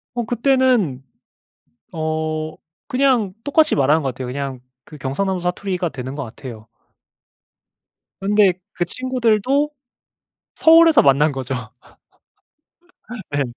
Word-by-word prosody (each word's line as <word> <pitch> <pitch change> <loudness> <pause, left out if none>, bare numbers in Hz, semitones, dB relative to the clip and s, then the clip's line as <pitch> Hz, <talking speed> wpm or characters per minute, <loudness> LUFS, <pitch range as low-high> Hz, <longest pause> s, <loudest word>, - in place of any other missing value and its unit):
어. 240 - -1
그때는. 245 - +1 0.9
어 155 -1 -3 0.3
그냥 255 -7 +1
똑같이 305 +2 +3
말하는 150 +3 +3
것 135 - -1
같아요. 130 +1 -7
그냥 135 0 -5 0.2
그 155 - -12
경상남도 180 +8 -2
사투리가 180 0 -2
되는 130 -3 -7
것 145 - -5
같아요. 110 -2 -10 1.5
그런데 200 -1 +3 0.2
그 175 - -1
친구들도 255 - 0 0.9
서울에서 325 -1 +6
만난 145 +2 +4
거죠. 135 -1 -4 1.8
네. 145 0 0
175 Hz, 225 characters per minute, -20 LUFS, -, 1.8 s, 서울에서